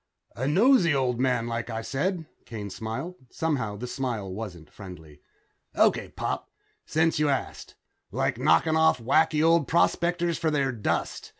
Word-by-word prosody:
"A 130 +5 -2
nosey 185 - +4
old 125 -3 0
man, 125 -3 +1
like 115 0 -4
I 115 -1 -4
said," 165 - -2 0.2
Kane 105 -4 -6
smiled. 115 - -5
Somehow, 125 -11 -2
the 120 - -5
smile 120 -7 -4
wasn't 90 -7 -8
friendly. 80 -7 -12 0.5
"Okay, - - +2
Pop, - - -4 0.4
since 160 0 +1
you 150 -1 +2
ask. 135 - -3 0.3
Like - - -1
knocking 120 - +3
off 160 -4 +4
wacky 155 +5 +2
old 165 -3 +4
prospectors 170 0 +1
for 160 - +1
their 140 -3 +1
dust. 115 -4 -3
135 Hz, 145 wpm, -26 LUFS, 110-160 Hz, 0.5 s, nosey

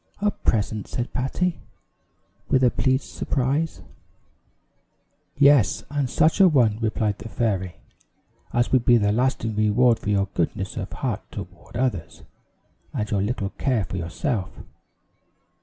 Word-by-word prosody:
"A 205 +1 +2
present!" 105 - -1
said 120 0 -4
Patty, 165 +7 -1 0.9
with 130 - +3
a 125 - +5
pleased 130 0 +1
surprise. 140 +5 -2 1.5
"Yes, 140 -6 +5
and 145 -3 -1
such 160 +8 +3
a 190 - +9
one," 120 -9 +3
replied 110 -2 0
the 110 - -8
fairy, 95 -6 -1 0.8
"as 120 0 +1
will 130 - +5
be 120 0 +4
a 105 -3 +3
lasting 115 -1 0
reward 110 +3 +3
for - - -4
your 100 -1 +2
goodness - - -2
of - - -5
heart - - -3
toward 90 +6 -9
others, 110 -11 -2 0.7
and 105 -1 -2
your 100 -2 +1
little 100 -1 -2
care 125 -7 +1
for 95 - -5
yourself. 95 - -2
115 Hz, 135 wpm, -24 LUFS, 105-130 Hz, 1.5 s, a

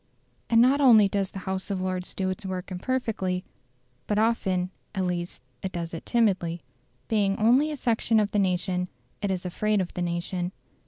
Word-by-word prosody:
And 230 - +5
not 265 +4 +5
only 225 -7 +7
does 195 -1 -1
the - - -9
House 190 0 -3
of 195 -2 -1
Lords 185 -1 -3
do 190 -1 0
its 195 +3 -6
work 190 0 -5
imperfectly, 190 -3 -1 0.6
but 210 - 0
often, 190 -5 +1 0.2
at 190 -1 0
least, 175 -6 -3 0.2
it 190 - -3
does 170 -2 -4
it 165 - -7
timidly. 190 -8 +1 0.4
Being 200 -3 +2
only 250 +8 +4
a 300 - -4
section 225 -2 +2
of 210 -1 +1
the 210 - +1
nation, 180 -1 0 0.3
it 205 - -1
is 185 -1 -2
afraid 210 +4 +1
of 185 -2 -2
the 180 - -4
nation. 175 +1 -2
190 Hz, 180 wpm, -27 LUFS, 180-215 Hz, 0.6 s, only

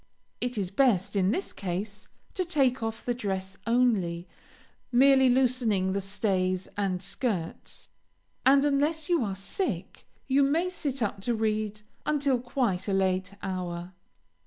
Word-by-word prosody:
It 245 -1 -1
is 190 -3 -2
best, 205 -5 +2
in 190 -1 +3
this 375 - -2
case, 200 +3 -5 0.3
to 370 - 0
take 275 -8 +1
off 225 0 -4
the 245 - +1
dress 195 -5 -3
only, 200 -8 +2 0.6
merely 265 +1 +6
loosening 240 -7 +2
the 200 - -1
stays 190 -2 -1
and 195 -2 -1
skirts, 200 -3 -4 0.6
and, 275 +2 +5
unless 295 +3 +1
you 340 -7 +3
are 200 -3 -2
sick, 195 - -4 0.2
you 275 +1 +3
may 325 +6 +2
sit 275 -8 -2
up 200 -1 -2
to 235 +4 0
read 215 -1 -1 0.2
until 280 -4 +1
quite 240 -7 -1
a 200 - 0
late 190 0 0
hour. 180 -1 -4
215 Hz, 140 wpm, -28 LUFS, 190-265 Hz, 0.6 s, merely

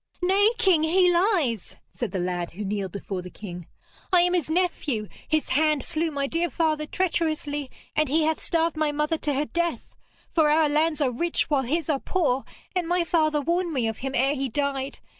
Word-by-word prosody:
'Nay, 390 +4 +4
king, 380 -8 +4
he 355 +3 +4
lies!' 340 - +1 0.2
said 240 -6 -3
the 190 - -2
lad 175 -1 -2
who 205 +4 -5
kneeled 195 -2 -2
before 195 -1 -5
the 180 - -9
king. 180 -4 -9 0.4
'I 360 -2 +6
am 355 0 +2
his 340 -5 0
nephew. 315 - 0 0.2
His 310 -1 0
hand 305 -1 +2
slew 330 0 -1
my 280 -2 -2
dear 335 +4 0
father 310 -2 0
treacherously, 310 -5 -1 0.3
and 305 -2 +2
he 315 +3 +3
hath 315 0 0
starved 330 -1 +1
my 310 -1 +1
mother 300 +2 -1
to 290 -2 -1
her 290 +3 0
death. 340 +2 -2 0.4
For 315 -3 +4
our 305 0 +4
lands 310 +1 +1
are 265 -3 +2
rich 330 +5 -1
while 280 -2 +3
his 300 +5 -1
are 295 -4 +1
poor, 275 -8 0 0.3
and 355 -2 0
my 350 0 +2
father 310 -3 +2
warned 340 +3 0
me 250 -5 +1
of 225 -1 -4
him 270 0 -3
ere 270 +3 +3
he 270 -2 -2
died. 275 +1 -2
305 Hz, 200 wpm, -25 LUFS, 265-335 Hz, 0.4 s, I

